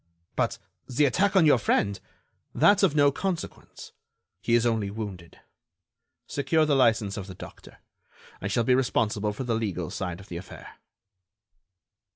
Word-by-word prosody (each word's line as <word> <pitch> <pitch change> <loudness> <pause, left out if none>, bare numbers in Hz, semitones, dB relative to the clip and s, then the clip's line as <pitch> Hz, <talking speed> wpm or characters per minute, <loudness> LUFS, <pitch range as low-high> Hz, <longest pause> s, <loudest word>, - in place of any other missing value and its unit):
"But - - 0 0.3
the 130 +4 +2
attack 190 +9 +1
on 185 -4 +6
your 145 -5 +5
friend?" 100 -2 +1 0.6
"That's 205 -1 +5
of 185 -7 +3
no 145 -1 +5
consequence. 185 +3 -5 0.5
He 115 - +2
is 120 0 +3
only 110 -4 0
wounded. 100 -5 -8 0.9
Secure 155 +3 +1
the 150 -2 +2
license 115 -6 +2
of 100 -2 -6
the 95 - -9
doctor. - - -12 0.6
I - - -2
shall 120 - +1
be 125 - +3
responsible 110 -5 +1
for 105 +6 -5
the 120 -2 -1
legal 95 -7 -3
side 90 -3 -4
of 100 - -13
the 85 - -6
affair." 90 - -11
115 Hz, 155 wpm, -26 LUFS, 100-145 Hz, 0.9 s, on